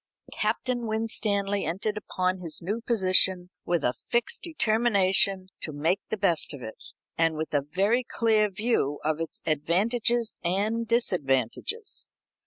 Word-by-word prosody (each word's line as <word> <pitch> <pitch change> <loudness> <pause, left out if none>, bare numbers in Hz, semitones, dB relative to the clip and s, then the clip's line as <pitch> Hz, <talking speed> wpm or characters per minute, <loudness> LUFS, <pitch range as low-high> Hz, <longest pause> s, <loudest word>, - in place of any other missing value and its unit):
Captain 240 +2 -1
Winstanley 210 -2 0
entered 195 +6 -2
upon 185 -3 -1
his 165 -3 -6
new 205 +7 -3
position 185 -5 +2
with 170 -4 0
a 125 - +2
fixed 235 - -2
determination 200 - +2
to 155 - -3
make 160 +6 +1
the 220 - -2
best 175 -6 +1
of 130 - -10
it, 110 - -8 0.4
and 165 -1 +3
with 155 0 -4
a 145 - +3
very 195 - +1
clear 220 -3 +2
view 200 - 0
of 155 +1 0
its 165 -1 -4
advantages 215 - +1
and 210 +6 0
disadvantages. 185 - 0
195 Hz, 135 wpm, -27 LUFS, 165-225 Hz, 0.4 s, and